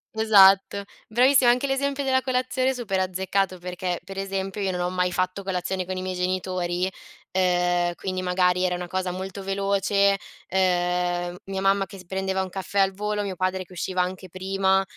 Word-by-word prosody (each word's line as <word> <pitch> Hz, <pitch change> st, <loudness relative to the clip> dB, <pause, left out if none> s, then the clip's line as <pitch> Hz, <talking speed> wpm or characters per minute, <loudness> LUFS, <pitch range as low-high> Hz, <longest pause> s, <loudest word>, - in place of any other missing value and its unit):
Esatto. 200 Hz, -2 st, +5 dB, 0.2 s
Bravissima 250 Hz, +2 st, +5 dB
anche 250 Hz, +3 st, 0 dB
l'esempio 280 Hz, +1 st, -1 dB
della 260 Hz, -1 st, +2 dB
colazione 255 Hz, 0 st, 0 dB
super 210 Hz, -7 st, -2 dB
azzeccato, 190 Hz, 0 st, -1 dB
perché 180 Hz, 0 st, -3 dB
per 195 Hz, +2 st, -9 dB
esempio 195 Hz, 0 st, -3 dB
io 195 Hz, -1 st, 0 dB
non 180 Hz, -1 st, -3 dB
ho 175 Hz, -, 0 dB
mai 180 Hz, 0 st, 0 dB
fatto 185 Hz, +2 st, -1 dB
colazione 185 Hz, 0 st, -2 dB
con 185 Hz, +1 st, -4 dB
i -, -, -3 dB
miei 185 Hz, 0 st, -3 dB
genitori, 180 Hz, 0 st, -1 dB, 0.4 s
ehm, 175 Hz, -1 st, +2 dB
quindi 185 Hz, +1 st, -3 dB
magari 180 Hz, 0 st, +2 dB
era 180 Hz, -, +1 dB
una 180 Hz, 0 st, -5 dB
cosa 185 Hz, 0 st, -2 dB
molto 190 Hz, +2 st, -6 dB
veloce, 200 Hz, 0 st, +2 dB, 0.3 s
ehm, 180 Hz, -1 st, 0 dB
mia 195 Hz, 0 st, -4 dB
mamma 195 Hz, 0 st, +3 dB
che 195 Hz, +1 st, -12 dB
si 180 Hz, -, -13 dB
prendeva 190 Hz, +1 st, -1 dB
un 190 Hz, -, -4 dB
caffè 195 Hz, +2 st, -3 dB
al 195 Hz, 0 st, +3 dB
volo, 210 Hz, +1 st, -2 dB
mio 195 Hz, -2 st, -4 dB
padre 185 Hz, +1 st, -1 dB
che 185 Hz, -, -16 dB
usciva 185 Hz, +1 st, -1 dB
anche 185 Hz, +1 st, -4 dB
prima, 190 Hz, +1 st, +1 dB
190 Hz, 180 wpm, -25 LUFS, 180-195 Hz, 0.4 s, Esatto